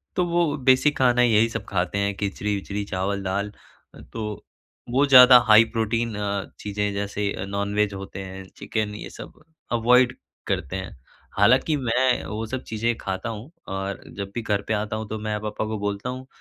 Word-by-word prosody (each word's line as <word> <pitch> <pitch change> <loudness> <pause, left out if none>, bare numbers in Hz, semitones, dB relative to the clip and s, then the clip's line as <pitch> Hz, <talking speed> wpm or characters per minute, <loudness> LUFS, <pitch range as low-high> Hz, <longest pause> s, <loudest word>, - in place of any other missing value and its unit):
तो 180 - +2
वो 170 -3 +1
बेसिक 135 +2 +3
खाना 125 -1 +4
यही 115 -1 +4
सब - - -5
खाते 90 +1 -1
हैं 100 0 0
खिचड़ी-विचड़ी 100 0 -3
चावल-दाल। 100 +1 -2 0.6
तो 115 - -4 0.7
वो 135 +4 +4
ज़्यादा 125 -2 +9
हाई 110 +1 +8
प्रोटीन 115 +1 0
अ, 100 -1 -2
चीज़ें 105 0 -2
जैसे 100 0 -2 0.2
नॉनवेज 100 +1 0
होते 95 0 -7
हैं 95 0 -8
चिकन 105 -2 -3
ये - - -7
सब - - -11 0.3
अवॉइड 125 +2 +4 0.3
करते 70 - -2
हैं। 95 -7 -6 0.4
हालाँकि 125 +9 +4
मैं 125 0 +1
वो 110 +1 -4
सब 130 +3 -5
चीज़ें 115 +2 0
खाता 95 +3 -4
हूँ 115 +6 -7 0.2
और 95 0 -4
जब 100 -1 -5
भी 120 - -1
घर 105 -3 0
पे 110 - 0
आता 105 +1 -2
हूँ 110 0 -4
तो 110 - -4
मैं 105 0 -2
पापा 105 0 -3
को 110 0 -3
बोलता 100 +3 -3
हूँ 130 +1 -6
105 Hz, 170 wpm, -24 LUFS, 100-120 Hz, 0.7 s, ज़्यादा